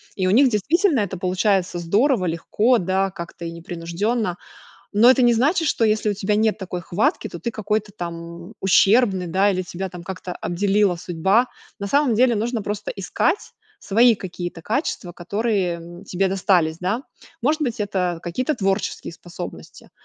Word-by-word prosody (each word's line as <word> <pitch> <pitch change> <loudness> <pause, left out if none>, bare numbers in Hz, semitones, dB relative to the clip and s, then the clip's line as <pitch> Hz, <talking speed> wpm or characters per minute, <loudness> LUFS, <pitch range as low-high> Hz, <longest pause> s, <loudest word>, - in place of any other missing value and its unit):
и 190 - -1
у - - +2
них 260 +6 +6
действительно 290 - +2
это 195 -2 -3
получается 185 0 +1
здорово, 205 - +2
легко, 210 +8 +1
да, 190 +2 0
как-то, 170 -2 -8
и 165 - -4
непринужденно. 175 +5 -2 0.6
Но 230 +4 +7
это 260 0 +4
не 240 -1 +5
значит, 300 +8 +2
что 230 - +1
если 215 -1 +2
у - - -1
тебя 205 +1 0
нет 220 0 +2
такой 185 -2 -5
хватки, 175 +5 0
то 170 - -9
ты 235 - -2
какой-то 215 -1 -2
там 170 +1 -7
ущербный, 195 0 +4
да, 190 +4 +2
или 185 -1 -1
тебя 185 +2 -5 0.2
как-то 185 0 -6
обделила 195 +2 +1
судьба. 190 +8 +1 0.3
На 200 - -3
самом 280 -1 +3
деле, 240 +1 +3
нужно 230 +1 -1
просто 205 0 -4
искать 200 - -1 0.3
свои 230 +4 +5
какие-то 175 -4 -6
качества, 220 - -2
которые, 195 +1 -1
м, 175 +3 -11
тебе 190 0 0
достались, 180 -4 +2
да. 195 +8 -1 0.4
Может 305 +5 +1
быть, 245 -4 -2
это 180 -4 -1
какие-то 250 - -1
творческие 195 -6 -2
способности. 170 +1 -10
195 Hz, 160 wpm, -22 LUFS, 175-225 Hz, 0.6 s, Но